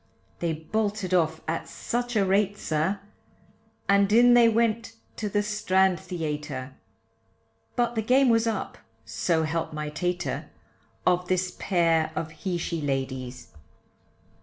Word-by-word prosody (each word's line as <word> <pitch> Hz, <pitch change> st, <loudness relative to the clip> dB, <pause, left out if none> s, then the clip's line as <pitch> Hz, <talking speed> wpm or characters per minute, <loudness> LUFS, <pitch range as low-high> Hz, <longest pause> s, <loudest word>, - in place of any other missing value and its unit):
They 170 Hz, -2 st, 0 dB
bolted 200 Hz, +3 st, -2 dB
off 160 Hz, -3 st, +2 dB
at 165 Hz, +1 st, -2 dB
such 245 Hz, 0 st, -3 dB
a 200 Hz, -2 st, +3 dB
rate, 200 Hz, +1 st, +2 dB
sir, 165 Hz, +5 st, -1 dB, 0.9 s
And 200 Hz, 0 st, +4 dB
in 240 Hz, +2 st, +7 dB
they 240 Hz, -1 st, +7 dB
went 225 Hz, 0 st, +1 dB, 0.2 s
to 210 Hz, -, -2 dB
the 205 Hz, +1 st, +1 dB
Strand 190 Hz, -4 st, +2 dB
Theatre, 150 Hz, -6 st, -4 dB, 1.0 s
But 240 Hz, -1 st, +1 dB
the 225 Hz, -, 0 dB
game 255 Hz, +4 st, +4 dB
was 230 Hz, 0 st, +3 dB
up, 220 Hz, -, -3 dB, 0.3 s
so 160 Hz, +8 st, 0 dB
help 160 Hz, +1 st, -2 dB
my 150 Hz, 0 st, -3 dB
tater, 180 Hz, +3 st, -2 dB, 0.6 s
Of 180 Hz, 0 st, +2 dB
this 185 Hz, 0 st, 0 dB
pair 165 Hz, -4 st, +2 dB
of 160 Hz, -1 st, -3 dB
he 175 Hz, +3 st, -3 dB
she 170 Hz, -1 st, -3 dB
ladies. 130 Hz, -3 st, -3 dB
180 Hz, 135 wpm, -26 LUFS, 160-215 Hz, 1.0 s, in